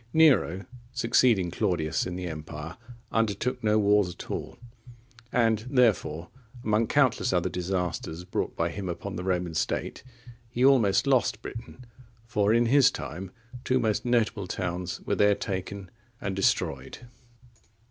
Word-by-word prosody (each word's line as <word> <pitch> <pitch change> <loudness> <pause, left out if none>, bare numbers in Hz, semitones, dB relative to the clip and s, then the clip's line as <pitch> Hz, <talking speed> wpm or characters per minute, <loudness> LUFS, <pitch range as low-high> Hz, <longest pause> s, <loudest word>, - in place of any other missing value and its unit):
Nero, 120 - +4 0.3
succeeding 115 -6 +3
Claudius 80 -3 0
in 90 - -5
the 90 0 -4
empire, 75 0 -7 0.4
undertook 115 +3 -1
no 105 0 +3
wars 105 -2 +3
at 85 - -9
all; - - -5 0.7
and, 115 -3 +3
therefore, 95 - +2 0.3
among 110 0 +2
countless 140 -5 +2
other 90 0 +1
disasters 90 -2 -3
brought - - -3
by 85 +1 0
him 95 0 -5
upon 95 +3 -5
the 90 - -4
Roman 90 -2 -1
state, 80 - -2 0.5
he 120 +2 +1
almost 115 -8 +4
lost 130 -5 +1
Britain; 120 +2 -9 0.4
for 105 -3 +1
in 120 +1 +4
his 135 +2 +5
time 95 -6 -6 0.3
two 130 0 +2
most 110 -3 0
notable 115 -5 +1
towns 90 0 -3
were - - -2
there 105 0 +4
taken 95 -1 -5 0.3
and 95 -1 -3
destroyed. 70 - -1
100 Hz, 135 wpm, -27 LUFS, 90-115 Hz, 0.7 s, his